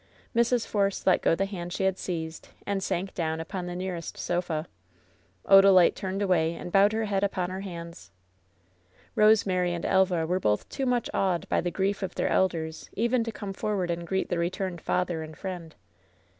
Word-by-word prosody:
Mrs. 235 0 +2
Force 200 -2 0
let 185 - +4
go - - +3
the 195 - 0
hand 175 -3 -6
she 190 - -2
had 190 -1 +1
seized 160 -2 -5 0.2
and 200 -1 -1
sank 190 +1 -2
down 160 -2 -2
upon 180 +2 -5
the 175 - -5
nearest 180 -2 -5
sof 175 0 -2
a, 155 -1 -1 0.8
Odalite 195 -2 +7
turned 195 +1 -3
away 170 -4 +2
and 175 - -7
bowed 200 +2 +5
her 220 0 -1
head 200 -1 0
upon 185 -2 -1
her 190 +1 -4
hands. 170 - -8 1.0
Rosemary 190 -5 +3
and 170 - -5
Elva 185 -4 +2
were 180 +3 0
both 105 - 0
too 270 -2 -2
much 245 -2 +1
awed 180 -4 0
by - - +2
the 175 - -1
grief 195 +3 -1
of 190 - -4
their - - 0
elders 165 -4 0
even 235 +2 +1
to 230 - -4
come 205 -3 -6
forward 190 -3 -1
and 170 0 -4
greet 190 +1 -1
the 175 - 0
returned 180 0 -2
father 175 -3 -1
and 155 0 -9
friend. 175 -4 -6
185 Hz, 190 wpm, -27 LUFS, 170-195 Hz, 1.0 s, Odalite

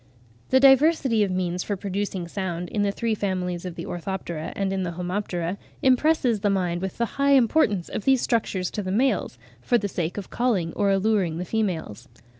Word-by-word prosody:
The 260 - +5
diversity 270 -4 +5
of 200 - 0
means 180 -1 -1
for 205 - -2
producing 195 -2 -3
sound 175 -2 -4
in 210 - -1
the 200 -1 +2
three 230 +2 -1
families 185 -4 -2
of 180 -2 -5
the - - -6
Orthoptera 175 -3 -4
and 195 -1 -1
in 190 - -1
the 175 -2 -3
Homoptera, 180 0 -3 0.2
impresses 260 -3 +3
the 205 0 +1
mind 180 -3 0
with 190 -1 -4
the 235 - +1 0.2
high 280 0 +5
importance 230 - +3
of - - -5
these 265 -1 +4
structures 195 -6 0
to 210 - -3
the 185 -2 -4
males, 220 - +1 0.2
for 240 - +2
the 205 -3 -2
sake 175 -2 -3
of 200 - -6
calling 205 -9 0
or 200 -1 +1
alluring 195 -4 +1
the 180 - -3
females. 180 - -3
195 Hz, 195 wpm, -25 LUFS, 180-225 Hz, 0.2 s, The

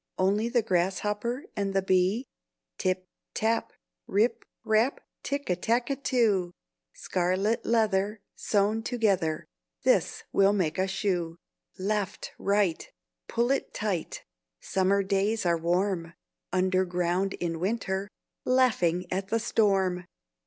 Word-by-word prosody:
Only 205 +5 +2
the 240 -1 +2
grasshopper 210 - -1
and 195 -1 -2
the 195 - +2
bee? 190 +6 +2 0.5
"Tip 185 -1 0 0.3
tap, 225 +1 0 0.4
rip 215 +5 +1 0.2
rap, 220 +5 +2 0.2
Tick 280 0 -3
a 180 - +2
tack 235 +8 0
too! 205 -9 +2 0.4
Scarlet 185 +5 0
leather, 210 -2 +2 0.2
sewn 210 +2 +1
together, 200 -10 0 0.4
This - - +2
will 195 +1 +5
make 180 -5 0
a 190 - +2
shoe. 180 -4 -1 0.4
Left, 200 +1 -2
right, 200 - +1 0.4
pull 240 +2 +1
it 275 - -1
tight; 200 -6 -3 0.3
Summer 195 +1 +1
days 200 +2 0
are 170 -1 +3
warm; 175 0 0 0.4
Underground 185 0 +1
in 165 -2 -3
winter, 195 0 -1 0.4
Laughing 215 -9 +2
at 190 +1 -1
the 225 - +1
storm!" 195 -5 +1
195 Hz, 115 wpm, -28 LUFS, 185-220 Hz, 0.5 s, will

